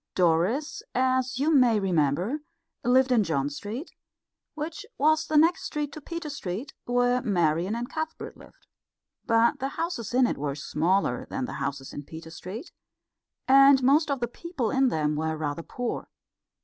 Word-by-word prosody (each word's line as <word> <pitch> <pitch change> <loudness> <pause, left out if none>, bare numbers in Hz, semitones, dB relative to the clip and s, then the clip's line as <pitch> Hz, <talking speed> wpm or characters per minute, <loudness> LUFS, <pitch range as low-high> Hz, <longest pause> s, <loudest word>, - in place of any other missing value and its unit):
Doris, 185 - +1
as 255 0 +1
you 300 +4 +2
may 245 -6 +5
remember, 180 - +1 0.4
lived 255 +2 +4
in 235 -4 +4
John 145 -5 -1
Street, 210 - -6 0.6
which 320 +6 -5
was 310 +2 +3
the 310 - +2
next 330 +3 +4
street 295 -2 -3
to 310 - -8
Peter 335 0 -5
Street, 240 0 -5
where 245 +1 +2
Marian 175 -2 +1
and 240 +1 -3
Cuthbert 315 +3 -5
lived. - - -18 0.6
But 230 0 +3
the 270 - -1
houses 330 - -3
in 255 0 +5
it - - -2
were 140 -1 -2
smaller 175 - 0
than 265 -1 -2
the - - -6
houses 135 -1 -4
in 145 - -6
Peter 160 +2 -10
Street, 190 - -8 0.8
and 275 0 +7
most 295 +4 +4
of 275 -3 -1
the 240 - 0
people 270 -2 -4
in 270 0 +3
them 150 -8 0
were 160 +1 -1
rather 150 +1 -3
poor. 245 +7 -4
245 Hz, 160 wpm, -27 LUFS, 170-280 Hz, 0.8 s, and